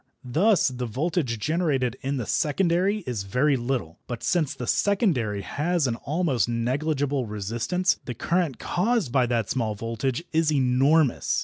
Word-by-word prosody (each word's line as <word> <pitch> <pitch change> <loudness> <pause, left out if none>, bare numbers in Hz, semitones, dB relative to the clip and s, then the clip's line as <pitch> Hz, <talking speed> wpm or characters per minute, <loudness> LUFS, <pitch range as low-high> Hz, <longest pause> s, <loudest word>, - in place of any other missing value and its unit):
Thus 180 - +3
the 125 -1 -4
voltage 135 - -1
generated 140 -3 0
in 140 +1 -2
the 120 - -3
secondary 180 - +1
is 120 -5 -3
very 125 +9 +1
little, 120 -9 -3
but 120 -2 -5
since 160 -6 +1
the 125 - -5
secondary 130 - +1
has 160 - 0
an 120 -3 0
almost 140 - 0
negligible 135 +2 -1
resistance 115 - -1
the 125 - -5
current 170 0 0
caused 205 - 0
by 130 -2 +3
that 115 -3 -1
small 110 -5 -1
voltage 115 +7 -3
is 160 -1 +2
enormous. 135 +2 +2
135 Hz, 145 wpm, -25 LUFS, 120-165 Hz, -, Thus